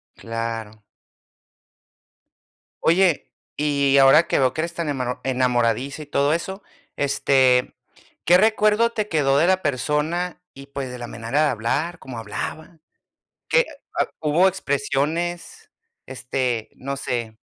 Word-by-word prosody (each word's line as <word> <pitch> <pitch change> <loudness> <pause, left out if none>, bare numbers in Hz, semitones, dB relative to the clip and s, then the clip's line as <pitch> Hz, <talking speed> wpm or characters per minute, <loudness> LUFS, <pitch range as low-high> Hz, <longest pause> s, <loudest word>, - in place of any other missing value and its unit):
Claro. 115 -2 -5 2.0
Oye, 175 -1 +2 0.3
y 140 -2 +2
ahora 135 +5 +6
que - - +1
veo 130 -1 +2
que 155 - 0
eres 170 +1 -4
tan 170 -3 -3
emano 125 -3 -3
enamoradiza 125 +1 0
y 150 - -9
todo 145 +1 +1
eso, 190 +4 -4 0.3
este, 130 -2 +2 0.5
¿qué 175 +1 +6
recuerdo 215 +1 +3
te 215 -2 -2
quedó 140 -5 +2
de 160 - +4
la 185 0 +2
persona, 150 +7 -1
y, 135 0 -11
pues, 140 -2 -5
de 125 - -7
la 120 - -6
manera 115 +7 -1
de 150 - +3
hablar, 140 +10 -2
cómo 130 -3 -9
hablaba? 155 - -6 0.7
Que, - - +5
eh - - -3 0.6
hubo 160 +5 +3
expresiones, 170 - -2 0.4
este 125 -3 -2
no 140 +1 -5
sé. 115 -4 -4
140 Hz, 130 wpm, -22 LUFS, 125-170 Hz, 2.0 s, ahora